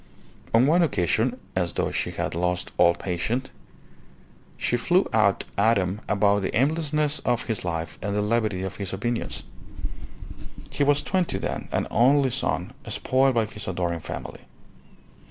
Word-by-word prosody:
On 115 Hz, +3 st, +5 dB
one 165 Hz, +5 st, +4 dB
occasion, 120 Hz, -, +1 dB, 0.2 s
as 90 Hz, -2 st, 0 dB
though -, -, -1 dB
she -, -, -1 dB
had -, -, -3 dB
lost 90 Hz, +1 st, -1 dB
all 85 Hz, 0 st, +6 dB
patience, 100 Hz, +9 st, -2 dB, 1.1 s
she -, -, 0 dB
flew 175 Hz, +10 st, +2 dB
out 105 Hz, -3 st, +3 dB, 0.2 s
at 110 Hz, +3 st, +4 dB
him 95 Hz, +2 st, -1 dB
about 100 Hz, 0 st, +3 dB
the 95 Hz, -, -2 dB
aimlessness 150 Hz, +2 st, +1 dB
of 120 Hz, -1 st, 0 dB
his 110 Hz, -3 st, -3 dB
life 80 Hz, -2 st, -4 dB
and 100 Hz, +2 st, -2 dB
the 105 Hz, -, +1 dB
levity 105 Hz, -4 st, 0 dB
of 95 Hz, 0 st, -4 dB
his 100 Hz, -2 st, -4 dB
opinions. 120 Hz, +5 st, -2 dB, 1.3 s
He -, -, +1 dB
was 145 Hz, 0 st, +3 dB
twenty 185 Hz, -2 st, 0 dB
then, -, -, -4 dB
an -, -, 0 dB
only 135 Hz, +4 st, +4 dB
son, -, -, -1 dB
spoiled 130 Hz, 0 st, +2 dB
by 115 Hz, -1 st, +3 dB
his 105 Hz, 0 st, -8 dB
adoring 85 Hz, -2 st, -1 dB
family. -, -, -7 dB
110 Hz, 155 wpm, -25 LUFS, 95-130 Hz, 1.3 s, all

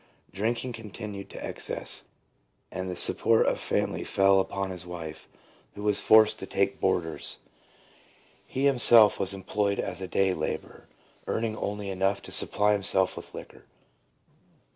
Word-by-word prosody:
Drinking 115 Hz, +5 st, -2 dB
con 115 Hz, -2 st, -9 dB
tinued 100 Hz, -2 st, -8 dB
to -, -, -8 dB
excess, -, -, -1 dB, 0.7 s
and 95 Hz, 0 st, -5 dB
the 90 Hz, -, -4 dB
support 115 Hz, +5 st, +3 dB
of -, -, +1 dB
the -, -, -10 dB
family -, -, -1 dB
fell 95 Hz, 0 st, +3 dB
upon 95 Hz, 0 st, -2 dB
his 90 Hz, -2 st, -5 dB
wife, 85 Hz, -3 st, -8 dB, 0.5 s
who 105 Hz, -, -8 dB
was 105 Hz, -1 st, +1 dB
forced 110 Hz, -1 st, +5 dB
to 95 Hz, -, -6 dB
take 100 Hz, 0 st, -1 dB
boarders. 85 Hz, -4 st, -1 dB, 1.1 s
He 135 Hz, +2 st, -2 dB
himself 120 Hz, -5 st, +6 dB
was 95 Hz, -, 0 dB
employed 100 Hz, +1 st, -1 dB
as 90 Hz, +1 st, -4 dB
a 95 Hz, -, -4 dB
day 95 Hz, 0 st, +1 dB
labourer, -, -, -5 dB, 0.4 s
earning 110 Hz, -1 st, -2 dB
only 100 Hz, -1 st, -4 dB
enough 95 Hz, +1 st, 0 dB
to -, -, -10 dB
supply 105 Hz, 0 st, +3 dB
himself 95 Hz, -2 st, 0 dB
with -, -, -10 dB
liquor. -, -, -11 dB
100 Hz, 150 wpm, -27 LUFS, 95-110 Hz, 1.1 s, himself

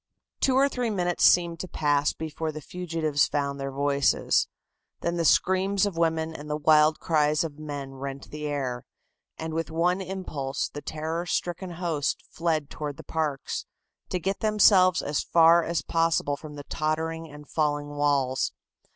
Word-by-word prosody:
Two 260 Hz, -, +2 dB
or 275 Hz, +1 st, +5 dB
three 250 Hz, -4 st, -2 dB
minutes 180 Hz, -4 st, 0 dB
seemed 170 Hz, -2 st, +4 dB
to 185 Hz, -, -5 dB
pass 145 Hz, -3 st, +1 dB
before 160 Hz, 0 st, -4 dB
the 155 Hz, -, -7 dB
fugitives 160 Hz, -3 st, 0 dB
found 140 Hz, -1 st, -2 dB
their 135 Hz, 0 st, -3 dB
voices. 140 Hz, 0 st, +2 dB, 0.5 s
Then 170 Hz, 0 st, -1 dB
the 170 Hz, -, +1 dB
screams 190 Hz, +5 st, +3 dB
of 200 Hz, -4 st, -3 dB
women 160 Hz, -1 st, 0 dB
and 150 Hz, -1 st, -9 dB
the 150 Hz, -, -1 dB
wild 155 Hz, 0 st, +4 dB
cries 150 Hz, -1 st, +2 dB
of 155 Hz, -2 st, -6 dB
men 145 Hz, -3 st, -6 dB
rent 135 Hz, 0 st, -7 dB
the 150 Hz, 0 st, -4 dB
air, 130 Hz, -4 st, -3 dB, 0.5 s
and 160 Hz, 0 st, -5 dB
with 165 Hz, +1 st, -2 dB
one 175 Hz, +4 st, +1 dB
impulse 175 Hz, -8 st, -3 dB
the 145 Hz, -, -8 dB
terror 160 Hz, +4 st, -4 dB
stricken 175 Hz, +1 st, -2 dB
host 165 Hz, -4 st, -2 dB
fled 160 Hz, -3 st, -1 dB
toward 145 Hz, -2 st, -5 dB
the -, -, -10 dB
parks, 155 Hz, -4 st, -3 dB, 0.4 s
to -, -, -1 dB
get 195 Hz, +3 st, -2 dB
themselves 200 Hz, -4 st, +5 dB
as 145 Hz, 0 st, 0 dB
far 170 Hz, 0 st, +5 dB
as 170 Hz, 0 st, -1 dB
possible 165 Hz, -3 st, +1 dB
from 150 Hz, 0 st, -10 dB
the 145 Hz, -, -7 dB
tottering 160 Hz, +1 st, -2 dB
and 150 Hz, 0 st, -12 dB
falling 145 Hz, -2 st, -1 dB
walls. 140 Hz, -3 st, +1 dB
160 Hz, 165 wpm, -26 LUFS, 145-170 Hz, 0.5 s, or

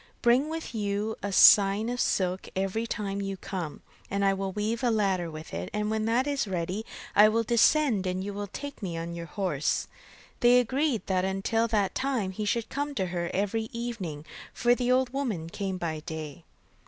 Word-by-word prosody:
Bring 250 Hz, +5 st, +4 dB
with 320 Hz, -5 st, -5 dB
you 210 Hz, 0 st, -1 dB
a 200 Hz, -, -3 dB
skein 200 Hz, +2 st, +7 dB
of 245 Hz, +1 st, -3 dB
silk 185 Hz, 0 st, 0 dB
every 195 Hz, +4 st, -1 dB
time 200 Hz, -3 st, -3 dB
that 200 Hz, -, -2 dB
you 195 Hz, -1 st, -4 dB
come, 175 Hz, -5 st, -5 dB, 0.3 s
and 200 Hz, 0 st, 0 dB
I 195 Hz, -, +4 dB
will 195 Hz, 0 st, -3 dB
weave 215 Hz, +5 st, -2 dB
a 245 Hz, -, +3 dB
ladder 195 Hz, -6 st, +1 dB
with 155 Hz, 0 st, -9 dB
it, 85 Hz, +2 st, -4 dB
and 210 Hz, 0 st, -1 dB
when 220 Hz, 0 st, 0 dB
that 235 Hz, +4 st, +2 dB
is 280 Hz, -5 st, -1 dB
ready 185 Hz, +3 st, -3 dB, 0.3 s
I 210 Hz, +1 st, +8 dB
will 230 Hz, +1 st, +1 dB
descend, 235 Hz, -2 st, +3 dB
and 185 Hz, +1 st, -2 dB
you 205 Hz, +1 st, -4 dB
will 205 Hz, 0 st, -4 dB
take 285 Hz, +7 st, -7 dB
me 175 Hz, -4 st, -3 dB
on 165 Hz, +1 st, -4 dB
your 170 Hz, 0 st, -6 dB
horse.' 170 Hz, -7 st, -1 dB, 0.5 s
They 245 Hz, +1 st, +6 dB
agreed 260 Hz, 0 st, 0 dB
that 185 Hz, -1 st, +1 dB
until 195 Hz, +4 st, 0 dB
that 210 Hz, -4 st, +1 dB
time 255 Hz, -8 st, -1 dB
he 210 Hz, +3 st, -4 dB
should 225 Hz, +2 st, 0 dB
come 285 Hz, +1 st, -3 dB
to 190 Hz, -, 0 dB
her 170 Hz, -1 st, -2 dB
every 220 Hz, +3 st, -1 dB
evening, 205 Hz, -11 st, -5 dB, 0.3 s
for 240 Hz, 0 st, +4 dB
the 245 Hz, 0 st, 0 dB
old 255 Hz, 0 st, +2 dB
woman 210 Hz, -13 st, -2 dB
came 190 Hz, 0 st, -3 dB
by 160 Hz, -3 st, -3 dB
day. 160 Hz, -1 st, -7 dB
205 Hz, 200 wpm, -28 LUFS, 185-235 Hz, 0.5 s, I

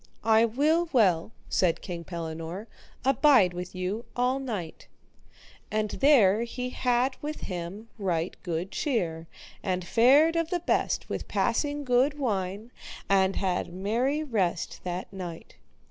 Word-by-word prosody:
I 225 Hz, 0 st, +5 dB
will 310 Hz, +9 st, +1 dB
well, 190 Hz, -, +3 dB, 0.2 s
said 175 Hz, -3 st, +1 dB
King 170 Hz, -2 st, -5 dB
Pellinore, 165 Hz, +3 st, -6 dB, 0.4 s
abide 260 Hz, -, +5 dB
with 180 Hz, +1 st, -6 dB
you 185 Hz, +5 st, -3 dB
all 250 Hz, +2 st, +1 dB
night. 210 Hz, -12 st, -5 dB, 0.8 s
And 215 Hz, -1 st, -1 dB
there 230 Hz, -8 st, +5 dB
he 250 Hz, +2 st, -4 dB
had 250 Hz, +1 st, +1 dB
with 305 Hz, +1 st, -5 dB
him 185 Hz, +4 st, -6 dB
right 175 Hz, -3 st, -1 dB
good 175 Hz, +2 st, -3 dB
cheer, 170 Hz, -, -2 dB, 0.3 s
and 185 Hz, -2 st, -2 dB
fared 275 Hz, -, +5 dB
of 330 Hz, -1 st, 0 dB
the 350 Hz, -1 st, -1 dB
best -, -, 0 dB
with -, -, -4 dB
passing 290 Hz, -1 st, 0 dB
good 260 Hz, +3 st, +2 dB
wine, 205 Hz, -3 st, -2 dB, 0.4 s
and 195 Hz, -1 st, +3 dB
had 185 Hz, -3 st, -1 dB
merry 235 Hz, -, 0 dB
rest 195 Hz, -, -1 dB
that 180 Hz, +2 st, -4 dB
night. 175 Hz, -4 st, -7 dB
215 Hz, 130 wpm, -27 LUFS, 180-260 Hz, 0.8 s, I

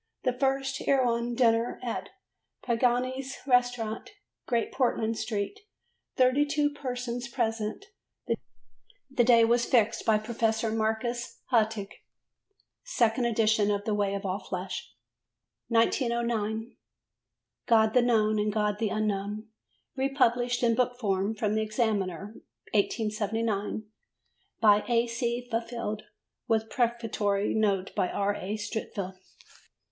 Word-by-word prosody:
The 255 Hz, -, +1 dB
first 270 Hz, +1 st, 0 dB
Erewhon 240 Hz, -3 st, +2 dB
dinner 230 Hz, -1 st, +2 dB
at 240 Hz, -, -3 dB, 0.5 s
Pagani's 255 Hz, +3 st, 0 dB
Restaurant, 245 Hz, -, +1 dB, 0.4 s
Great 235 Hz, -3 st, 0 dB
Portland 230 Hz, -3 st, 0 dB
Street; 220 Hz, -, -3 dB, 0.6 s
32 290 Hz, +3 st, +3 dB
persons 250 Hz, -3 st, -4 dB
present: 225 Hz, -, -2 dB, 1.3 s
the 250 Hz, -2 st, +3 dB
day 230 Hz, -1 st, +6 dB
was 235 Hz, +1 st, +3 dB
fixed 230 Hz, -4 st, +2 dB
by 220 Hz, -1 st, +4 dB
Professor 225 Hz, 0 st, 0 dB
Marcus 225 Hz, +2 st, -2 dB
Hartog. 220 Hz, -4 st, +2 dB, 0.9 s
Second 240 Hz, -, +1 dB
Edition 220 Hz, -2 st, +2 dB
of 205 Hz, 0 st, -1 dB
The 215 Hz, -, 0 dB
Way 200 Hz, -1 st, 0 dB
of 200 Hz, 0 st, -5 dB
All 190 Hz, +1 st, -1 dB
Flesh. 185 Hz, -1 st, -5 dB, 0.8 s
1909. 230 Hz, -1 st, 0 dB, 0.9 s
God 220 Hz, -2 st, +4 dB
the 250 Hz, -, +5 dB
Known 215 Hz, -3 st, +2 dB
and 210 Hz, 0 st, +1 dB
God 210 Hz, -1 st, 0 dB
the 225 Hz, -2 st, +1 dB
Unknown 210 Hz, +1 st, -2 dB, 0.5 s
republished 250 Hz, -3 st, +1 dB
in 230 Hz, -1 st, +4 dB
book 245 Hz, +1 st, +1 dB
form 200 Hz, -2 st, 0 dB
from 210 Hz, -1 st, 0 dB
the 220 Hz, -, +1 dB
Examiner 210 Hz, -3 st, -1 dB, 0.4 s
(1879) 215 Hz, 0 st, 0 dB, 0.8 s
by 210 Hz, -2 st, +5 dB
A. 235 Hz, -1 st, +3 dB
C. 240 Hz, +1 st, -2 dB
Fifield, 230 Hz, -2 st, -3 dB, 0.5 s
with 220 Hz, -1 st, +1 dB
prefatory 225 Hz, -4 st, 0 dB
note 200 Hz, -3 st, +1 dB
by 180 Hz, -, 0 dB
R. 200 Hz, 0 st, 0 dB
A. 205 Hz, +4 st, -4 dB
Streatfeild. 205 Hz, -3 st, -5 dB
225 Hz, 110 wpm, -28 LUFS, 210-245 Hz, 1.3 s, day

